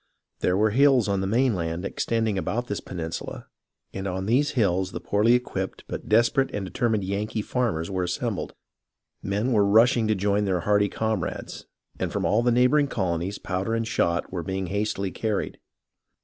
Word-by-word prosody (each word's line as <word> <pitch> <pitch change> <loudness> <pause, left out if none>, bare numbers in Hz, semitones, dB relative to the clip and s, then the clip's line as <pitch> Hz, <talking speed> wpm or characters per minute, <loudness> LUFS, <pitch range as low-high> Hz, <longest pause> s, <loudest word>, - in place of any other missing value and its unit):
There 90 +1 +1
were 110 +1 +3
hills 130 -1 +4
on 100 -1 0
the 95 - -1
mainland 95 -7 0
extending 110 +1 -1
about 115 +6 -2
this 105 - -3
peninsula, 80 -3 -6 0.5
and 95 0 -4
on 95 0 -3
these 130 +7 +2
hills 95 -4 +1
the - - -4
poorly 105 +4 +2
equipped 95 -6 -2
but - - -6
desperate 115 +5 +3
and 100 -2 -3
determined 110 +1 0
Yankee 105 +3 -2
farmers 105 -9 -1
were 95 -1 -1
assembled. 90 - -3 0.7
Men 105 +6 -1
were 105 -4 +4
rushing 110 +3 +4
to 110 - +2
join 100 +1 +1
their 95 -3 0
hardy 105 +1 +2
comrades, 110 -5 -3 0.3
and - - -2
from - - -1
all 110 - +3
the 120 0 +2
neighbouring 125 +5 +4
colonies 95 -4 -2
powder 95 +4 -2
and 115 0 -1
shot 85 -5 0
were 90 - -2
being 95 +2 -3
hastily 100 -2 -1
carried. 110 0 -2
105 Hz, 170 wpm, -25 LUFS, 95-115 Hz, 0.7 s, hills